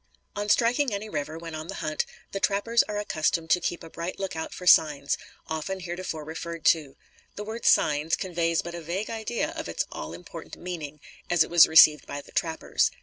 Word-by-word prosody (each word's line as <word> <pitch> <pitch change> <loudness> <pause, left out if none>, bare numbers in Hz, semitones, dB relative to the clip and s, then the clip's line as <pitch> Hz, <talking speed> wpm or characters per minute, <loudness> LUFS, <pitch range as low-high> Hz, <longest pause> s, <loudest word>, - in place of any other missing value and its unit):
On 205 0 -3
striking 245 +4 +3
any 205 +1 -4
river, 150 -2 -4
when 165 0 -8
on 155 +1 -6
the 195 - -6
hunt, 155 -3 -2 0.2
the 195 - -3
trappers 210 +4 +2
are 210 - -2
accustomed 160 -4 -1
to 180 - +5
keep 175 - -3
a 165 - -10
bright 170 +2 -5
lookout 185 -5 -4
for 180 - -8
signs, 150 -5 +5 0.3
often 160 +5 -4
heretofore 175 -3 -5
referred 165 +1 -6
to. 150 -5 -10 0.4
The 210 - -5
word 220 +2 -6
"signs" 150 +2 +3
conveys 170 -2 -1
but 170 - -6
a 170 - -6
vague 180 +8 -3
idea 225 +1 -2
of - - -6
its - - -1
all 75 +1 -6
important 90 - -9
meaning, 155 -5 -6 0.3
as 175 -2 +5
it - - -9
was 170 -2 +8
received 155 -2 +7
by 145 - -5
the - - -13
trappers. 160 -1 0
170 Hz, 200 wpm, -27 LUFS, 155-195 Hz, 0.4 s, was